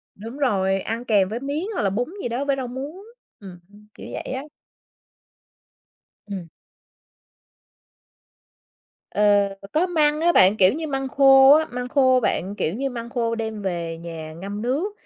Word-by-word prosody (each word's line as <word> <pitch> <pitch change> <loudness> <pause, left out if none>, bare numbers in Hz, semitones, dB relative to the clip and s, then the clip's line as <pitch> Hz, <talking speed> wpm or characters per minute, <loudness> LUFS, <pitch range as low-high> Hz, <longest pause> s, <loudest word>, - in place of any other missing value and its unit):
Đúng 225 +6 -9
rồi, 195 -8 +1
ăn 230 +4 -4
kèm 200 -5 +2
với 225 +3 -4
miến 285 +6 -3
hoặc - - -2
là 195 - +1
bún 245 - -3
gì - - -3
đó 250 +4 -2
với 280 -1 +1
rau 260 -2 -4
muống, 285 +10 -7 0.4
ừm, 185 -3 -11
ưm, 210 +1 -19
kiểu - - -11
vậy - - -5
á. 265 +1 -4 1.8
Ừm. 190 -5 -7 2.6
Ờ, 205 -1 +3 0.2
có 325 +4 +2
măng 305 -4 +1
á 345 +1 +3
bạn, 190 - +5
kiểu 190 -2 +5
như, 315 +2 -4
măng 270 -2 -3
khô 270 0 +6
á, 315 +1 +4
măng 250 0 -5
khô 260 -1 +3
bạn, 195 -2 -1
kiểu 165 -4 -2
như, 270 +4 -2
măng 235 -1 -7
khô 230 -2 -1
đem 220 -2 -4
về 170 -3 -3
nhà 165 -2 -8
ngâm 200 +6 -6
nước, 290 - -1
235 Hz, 165 wpm, -23 LUFS, 200-275 Hz, 2.6 s, khô